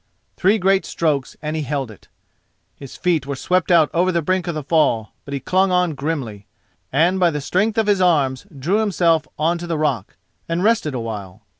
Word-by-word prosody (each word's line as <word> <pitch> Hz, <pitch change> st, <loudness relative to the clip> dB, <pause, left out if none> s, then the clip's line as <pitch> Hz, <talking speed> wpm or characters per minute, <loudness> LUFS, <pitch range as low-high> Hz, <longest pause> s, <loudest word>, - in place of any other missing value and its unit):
Three 200 Hz, +4 st, +3 dB
great 195 Hz, 0 st, +2 dB
strokes 150 Hz, -5 st, -2 dB
and 155 Hz, +1 st, -3 dB
he 155 Hz, -, -1 dB
held 135 Hz, -4 st, -3 dB
it. 105 Hz, -, -17 dB, 0.7 s
His 140 Hz, -2 st, -11 dB
feet 165 Hz, -6 st, 0 dB
were 140 Hz, -, -3 dB
swept 180 Hz, +6 st, 0 dB
out 165 Hz, -4 st, +4 dB
over 180 Hz, +2 st, +2 dB
the 170 Hz, -2 st, 0 dB
brink 185 Hz, +3 st, 0 dB
of 170 Hz, -, -2 dB
the 155 Hz, -, -4 dB
fall, 135 Hz, -8 st, +1 dB, 0.2 s
but 140 Hz, -, -7 dB
he -, -, -2 dB
clung 185 Hz, +7 st, +1 dB
on 180 Hz, -2 st, +2 dB
grimly, 135 Hz, -9 st, -4 dB, 0.4 s
and 170 Hz, +7 st, +2 dB
by 175 Hz, -2 st, +4 dB
the 150 Hz, -2 st, -3 dB
strength 200 Hz, +9 st, 0 dB
of 225 Hz, -, +3 dB
his 205 Hz, -2 st, +2 dB
arms 145 Hz, -3 st, +2 dB
drew 175 Hz, +11 st, +1 dB
himself 170 Hz, -7 st, +2 dB
on 165 Hz, +3 st, +1 dB
to 175 Hz, -, -6 dB
the 165 Hz, -2 st, -1 dB
rock 140 Hz, -10 st, -1 dB, 0.3 s
and 170 Hz, +2 st, -1 dB
rested 210 Hz, -, +1 dB
a -, -, -2 dB
while. 105 Hz, -3 st, -7 dB
160 Hz, 205 wpm, -20 LUFS, 140-180 Hz, 0.7 s, out